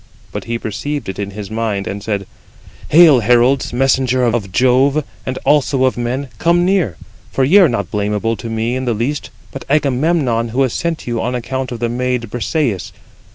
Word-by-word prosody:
But - - -6
he 115 0 -2
perceived 115 +3 -4
[it] 95 - -6
in 100 -1 -3
his 100 0 -8
mind, 110 -3 -2
and 100 +1 -5
said: 100 -2 -3 0.6
"Hail, 155 -4 +7
heralds, 120 +4 +3
messengers 130 -1 +2
of 100 -5 -2
Jove, 130 +5 +3
43 155 0 -3 0.2
and 130 0 -2
also 140 -2 +2
of 130 - +1
men, 125 +3 -3
come 175 +1 +3
near, 180 - +1 0.3
for 135 - +1
ye 170 +10 +6
are 180 -6 +6
not 100 -7 -3
blamable 105 +2 -1
to 115 - -7
me 115 +2 -1
in 130 0 -3
the 120 -2 0
least, 130 +7 -2 0.2
but 135 - -7
Agamemnon, 140 -4 +1
who 130 +4 +1
has 130 -3 -1
sent 170 -1 -2
you 120 -2 -2
on 125 +1 -2
account 130 +2 -3
of 120 - -4
the 120 - +1
maid 125 -2 -2
Brisëis. 120 - -1
125 Hz, 195 wpm, -17 LUFS, 115-135 Hz, 0.6 s, Hail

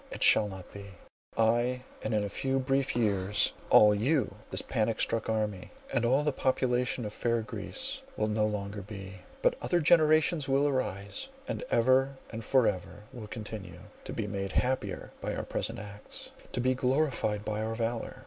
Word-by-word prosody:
It - - -3
shall 105 - +6
not 95 -2 -9
be! 100 -1 -10 0.4
"I, 120 +3 +2 0.2
and - - -2
in 105 - +2
a - - -1
few 135 +6 -1
brief 135 0 +1
years, 105 -3 +1 0.2
all 105 -1 +8
you,—this 125 +3 0
panic 110 0 0
struck 115 -1 0
army, 105 -4 -1 0.2
and 120 - +2
all 130 +5 +3
the 150 - +2
population 125 -2 0
of 105 - -5
fair 115 0 0
Greece, 265 - -4 0.2
will - - +1
no 105 0 +2
longer 100 -1 -3
be. 95 -1 -8 0.3
But - - +4
other 175 - +2
generations 155 -1 +4
will 140 +2 +3
arise, 130 - -2 0.2
and - - -3
ever 130 +3 +3 0.2
and 115 0 -5
for 130 +1 +4
ever 95 +1 -2
will 110 -4 -7
continue, 105 -6 -7 0.2
to - - -5
be 110 - -2
made 100 -2 -3
happier 130 +1 -1
by - - -2
our - - -3
present 115 - -3
acts, 105 -1 -6 0.2
to - - -3
be 130 +1 +3
glorified 130 -5 0
by 105 0 -2
our 110 +1 -2
valour. 115 0 -2
115 Hz, 175 wpm, -30 LUFS, 105-130 Hz, 0.4 s, all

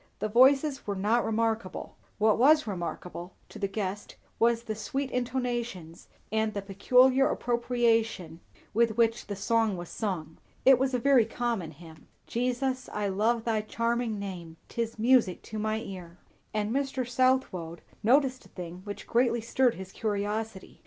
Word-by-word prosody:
The 215 - -2
voices 270 +4 +4
were 200 - -1
not 215 +5 +2
remarkable; 225 -3 -2 0.2
what 215 +1 +3
was 305 +4 +6
remarkable, 180 -2 -6
to - - -10
the 200 - 0
guest, 195 0 -4 0.2
was 230 0 +3
the 220 - -3
sweet 265 +6 -3
intonations 240 -9 -3 0.2
and 220 -1 0
the 200 - -2
peculiar 250 +7 +4
appropriation 230 -8 0 0.3
with 230 0 +2
which 230 0 +2
the 205 - -4
song 220 0 +1
was 175 -1 -7
sung. 165 -7 -4 0.3
It 260 -1 +7
was 265 -1 +1
a - - +3
very 255 -2 +4
common 230 -8 -2
hymn, 160 +1 -14 0.2
"Jesus, 255 +2 -1
I 205 -1 -1
love 220 +4 +1
thy 225 -2 0
charming 230 +1 -1
name, 175 -5 -7
'Tis 230 -1 -3
music 230 -5 +3
to 215 - -6
my 215 +1 0
ear;" 180 -4 -9 0.3
And 210 0 -1
Mr. 270 -1 -1
Southwode 245 -10 0 0.2
noticed 260 +2 +3
a - - -27
thing 180 0 -8
which 205 -1 -7
greatly 235 0 +2
stirred 245 +2 +2
his 190 0 -9
curiosity. 210 -1 -3
225 Hz, 150 wpm, -28 LUFS, 200-245 Hz, 0.3 s, It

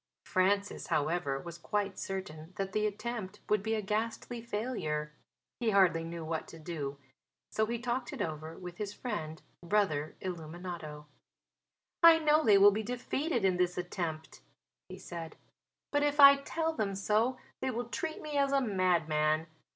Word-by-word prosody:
Francis, 200 +2 +1
however, 150 -2 0
was 170 +3 -8
quite 205 +1 -2
certain 180 -3 -6
that 195 -1 -3
the 215 +1 +1
attempt 210 -2 -5
would 210 -1 +2
be 220 +2 0
a 215 - -2
ghastly 225 +3 -2
failure. 200 -10 -3 0.5
He 235 -2 +1
hardly 185 -5 +4
knew 165 0 -6
what 160 0 -3
to 165 - -11
do. 150 -4 -5 0.5
So 220 0 +1
he 235 +1 -1
talked 240 +1 -2
it - - -7
over 155 0 -4
with 180 -1 -8
his 205 -1 -3
friend, 160 -10 -5 0.2
Brother 170 -6 +1
Illuminato. 165 -3 -6 1.0
"I 335 -1 +9
know 310 -1 +4
they 210 -3 +6
will 200 +1 +8
be 210 +2 -1
defeated 250 +2 -1
in 185 -2 +3
this 180 0 +1
attempt," 170 -3 -4 0.5
he 185 - -8
said. 170 -3 -7 0.6
"But 290 - +2
if 290 0 +1
I 280 0 +10
tell 320 +3 -2
them 205 -9 -1
so 215 +6 +1 0.2
they 265 - 0
will 240 -1 -2
treat 315 +7 -4
me 300 -1 -3
as 275 -1 +3
a 275 - +4
madman. 165 - +2
195 Hz, 160 wpm, -32 LUFS, 165-235 Hz, 1.0 s, I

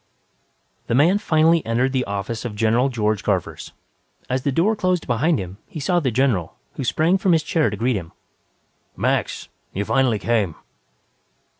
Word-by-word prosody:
_ - - -41
The 115 - 0
man 170 +9 +4
finally 160 -2 +3
entered 120 +4 0
the 130 -1 0
office 100 +3 -4
of 120 -4 -5
General 115 +5 +2
George 110 -4 -1
Garvers. - - -2 0.6
As 130 +1 0
the 140 - 0
door 185 +11 +2
closed 185 -4 0
behind 140 +7 +1
him, 95 0 -7
he 155 - -8
saw 175 +5 +1
the 140 -6 0
general, 115 -9 0 0.2
who - - -5
sprang 165 +9 +2
from 185 -1 +3
his 160 -1 +2
chair 155 -3 +1
to 105 - -5
greet 120 +3 +1
him. 85 -3 -7 0.9
"Max! - - -1 0.3
You 100 +2 -2
finally 130 -3 +2
came." 105 -6 0
130 Hz, 170 wpm, -22 LUFS, 110-160 Hz, 0.9 s, man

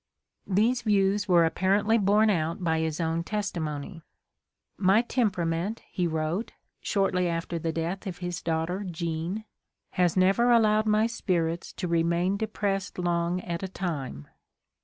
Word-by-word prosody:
These 225 +6 +2
views 205 -1 +2
were 175 -3 +5
apparently 200 +6 +2
borne 210 +2 +4
out 165 0 -1
by 160 -1 +1
his 160 0 -2
own 165 0 0
testimony. 170 -5 -3 0.8
f"My 195 +4 +4
temperament," 195 -5 -1
he 180 -2 0
wrote, 160 +6 -2 0.3
shortly 190 -3 +1
after 165 0 -3
the 165 0 -1
death 170 +5 -3
of 185 - -5
his 175 0 -4
daughter 165 +4 -1
Jean, 170 +3 -3 0.5
"has 180 -1 +1
never 195 +6 +4
allowed 215 -2 +4
my 215 +1 +3
spirits 175 -7 -1
to 180 - -4
remain 170 +3 +1
depressed 200 -2 -2
long 175 0 0
at 170 -2 -4
a 190 - -3
time." 145 - -5
180 Hz, 140 wpm, -27 LUFS, 165-205 Hz, 0.8 s, were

